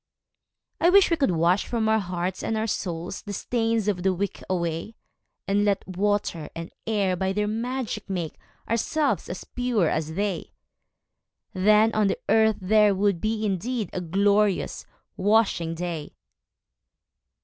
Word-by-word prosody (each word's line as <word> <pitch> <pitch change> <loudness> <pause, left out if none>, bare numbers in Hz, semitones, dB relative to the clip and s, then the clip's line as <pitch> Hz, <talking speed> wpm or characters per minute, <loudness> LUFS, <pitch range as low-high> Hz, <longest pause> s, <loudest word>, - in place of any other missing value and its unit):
I 340 - +5
wish 390 -1 +6
we - - +5
could 275 - +2
wash 175 +3 +2
from 225 -2 0
our 220 0 +3
hearts 180 -1 -3
and 225 - -1
our 220 - 0
souls 175 -4 -3
The 205 - -7
stains 225 0 0
of 195 -4 0
the 190 0 +1
week 200 +2 -3
away, 170 +3 -2 0.5
And 200 +1 +2
let 200 -2 0
water 190 -4 -1
and 165 0 -6 0.2
air 200 -4 +1
by 190 +1 -1
their 210 +1 0
magic 230 -1 -3
make 175 -5 -4 0.3
Ourselves 280 +6 0
as - - -5
pure 245 -9 0
as 160 0 -2
they; 200 -2 -2 1.0
Then 215 +4 +4
on 215 -1 +3
the - - 0
earth 220 -1 +4
there 210 +1 +4
would 200 -2 +1
be 220 0 -1
indeed 210 +2 -2
A 185 - -2
glorious 200 +3 +1 0.3
washing 195 -5 +2
day! 165 -3 -5
205 Hz, 150 wpm, -25 LUFS, 180-220 Hz, 1.0 s, wish